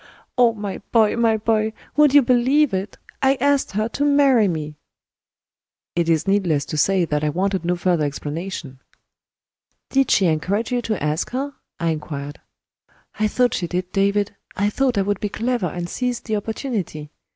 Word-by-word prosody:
Oh, 245 Hz, -2 st, +5 dB
my 205 Hz, -2 st, -5 dB
boy! 220 Hz, -3 st, +4 dB
my 230 Hz, -1 st, +2 dB
boy! 220 Hz, 0 st, 0 dB, 0.2 s
would 300 Hz, -2 st, +5 dB
you 290 Hz, -, +8 dB
believe 255 Hz, +3 st, +3 dB
it? 190 Hz, +2 st, -3 dB, 0.2 s
I 270 Hz, 0 st, +4 dB
asked 280 Hz, -2 st, +1 dB
her 215 Hz, +2 st, 0 dB
to 285 Hz, -, -2 dB
marry 280 Hz, -6 st, +4 dB
me!" 155 Hz, -4 st, -3 dB, 1.2 s
It 170 Hz, -1 st, +1 dB
is 160 Hz, +2 st, +1 dB
needless 175 Hz, -8 st, +1 dB
to -, -, -1 dB
say 185 Hz, +4 st, +3 dB
that 150 Hz, -1 st, -1 dB
I 150 Hz, -, +2 dB
wanted 190 Hz, +3 st, -1 dB
no 175 Hz, +1 st, 0 dB
further 175 Hz, -2 st, +1 dB
explanation. 150 Hz, -1 st, -5 dB, 1.1 s
"Did 270 Hz, -1 st, +2 dB
she 195 Hz, -, +4 dB
encourage 180 Hz, +8 st, 0 dB
you 245 Hz, -1 st, +1 dB
to 215 Hz, -8 st, -3 dB
ask 150 Hz, +3 st, -1 dB
her?" 280 Hz, +2 st, -2 dB, 0.3 s
I 170 Hz, -1 st, +1 dB
inquired. 145 Hz, -2 st, -6 dB, 0.8 s
"I 215 Hz, -, +3 dB
thought 245 Hz, +3 st, +1 dB
she 175 Hz, -, -2 dB
did, 180 Hz, +1 st, -3 dB
David 200 Hz, +1 st, +1 dB, 0.2 s
I 205 Hz, +2 st, +1 dB
thought 255 Hz, -1 st, +1 dB
I 195 Hz, -, +3 dB
would 205 Hz, 0 st, -1 dB
be 210 Hz, -, -2 dB
clever 230 Hz, -1 st, -1 dB
and 175 Hz, +1 st, -4 dB
seize 250 Hz, +5 st, -2 dB
the 220 Hz, -, -2 dB
opportunity. 205 Hz, -, -4 dB
205 Hz, 175 wpm, -21 LUFS, 170-240 Hz, 1.2 s, you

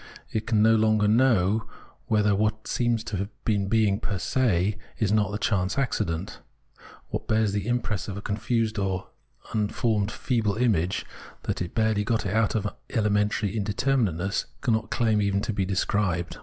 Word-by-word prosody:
It 110 Hz, 0 st, -2 dB
can 110 Hz, -4 st, +3 dB
no 110 Hz, 0 st, +6 dB
longer 110 Hz, -1 st, +3 dB
know 110 Hz, -3 st, +3 dB, 0.4 s
whether 105 Hz, -2 st, +3 dB
what 110 Hz, +2 st, 0 dB
seems 120 Hz, -2 st, 0 dB
to 110 Hz, -4 st, -4 dB
have 100 Hz, +2 st, -3 dB, 0.2 s
being 105 Hz, -1 st, +2 dB
per 100 Hz, -3 st, -2 dB
se 105 Hz, -2 st, +1 dB, 0.2 s
is 105 Hz, -3 st, +1 dB
not 105 Hz, -2 st, +2 dB
a 105 Hz, -, -2 dB
chance 100 Hz, -2 st, 0 dB
accident. 100 Hz, -10 st, -1 dB, 0.7 s
What -, -, -4 dB
bears 110 Hz, -1 st, +2 dB
the 100 Hz, +1 st, -2 dB
impress 120 Hz, -4 st, -1 dB
of 100 Hz, -1 st, -5 dB
a -, -, -5 dB
confused 110 Hz, +1 st, -1 dB
or 95 Hz, -1 st, -2 dB, 0.4 s
unformed 105 Hz, -1 st, 0 dB
feeble 110 Hz, -6 st, 0 dB
image, 100 Hz, -7 st, +1 dB, 0.4 s
that -, -, -2 dB
has 90 Hz, -, -2 dB
barely 110 Hz, +1 st, +1 dB
got 115 Hz, -1 st, 0 dB
out 105 Hz, +3 st, +1 dB
of 105 Hz, -2 st, 0 dB, 0.2 s
elementary 105 Hz, -2 st, +1 dB
indeter 110 Hz, +6 st, 0 dB
minateness, 95 Hz, -4 st, 0 dB, 0.2 s
cannot 115 Hz, -4 st, 0 dB
claim 110 Hz, -3 st, +2 dB
even 100 Hz, -1 st, +1 dB
to 110 Hz, -, -2 dB
be 100 Hz, -1 st, 0 dB
described. 95 Hz, -2 st, -1 dB
105 Hz, 160 wpm, -26 LUFS, 100-110 Hz, 0.7 s, no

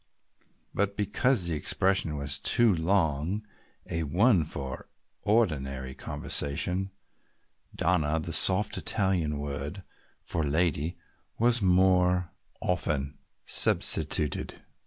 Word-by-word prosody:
But 100 Hz, 0 st, -2 dB
because 105 Hz, +1 st, 0 dB
the 85 Hz, -, -2 dB
expression 90 Hz, 0 st, 0 dB
was 70 Hz, -1 st, -4 dB
too 115 Hz, +9 st, +4 dB
long 85 Hz, +2 st, -1 dB, 0.4 s
a 80 Hz, -, -3 dB
one 90 Hz, -, +2 dB
for 70 Hz, -3 st, -7 dB, 0.4 s
ordinary 70 Hz, -, -1 dB
conversation, 90 Hz, +10 st, -2 dB, 0.9 s
"Donna," 80 Hz, -3 st, 0 dB
the 80 Hz, +1 st, -5 dB
soft 95 Hz, +5 st, +4 dB
Italian 90 Hz, -7 st, -1 dB
word 70 Hz, +5 st, -6 dB, 0.4 s
for 80 Hz, -, -3 dB
"lady," 80 Hz, +2 st, -1 dB, 0.4 s
was 120 Hz, 0 st, +2 dB
more 90 Hz, -2 st, +2 dB, 0.3 s
often 75 Hz, -5 st, -2 dB, 0.3 s
substituted. 75 Hz, -, +3 dB
85 Hz, 95 wpm, -27 LUFS, 75-95 Hz, 0.9 s, too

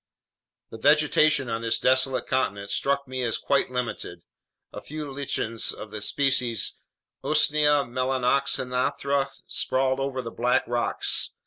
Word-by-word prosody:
The 110 Hz, -, -9 dB
vegetation 150 Hz, 0 st, +4 dB
on 115 Hz, 0 st, -3 dB
this 115 Hz, -1 st, +1 dB
desolate 130 Hz, 0 st, +2 dB
continent 100 Hz, -6 st, -1 dB
struck 140 Hz, +3 st, 0 dB
me 130 Hz, 0 st, -4 dB
as 115 Hz, -2 st, 0 dB
quite 140 Hz, -, +1 dB
limited. 125 Hz, -2 st, -4 dB, 0.5 s
A -, -, -7 dB
few 150 Hz, -2 st, -7 dB
lichens 115 Hz, -5 st, -1 dB
of 110 Hz, -, -9 dB
the 110 Hz, -, -6 dB
species 125 Hz, -2 st, +1 dB, 0.5 s
Usnea 150 Hz, -1 st, +3 dB
melanoxanthra 130 Hz, +2 st, 0 dB, 0.2 s
sprawled 130 Hz, 0 st, 0 dB
over 135 Hz, -1 st, -2 dB
the 115 Hz, -, -6 dB
black 125 Hz, +2 st, +1 dB
rocks. 120 Hz, 0 st, -1 dB
130 Hz, 125 wpm, -25 LUFS, 120-140 Hz, 0.5 s, vegetation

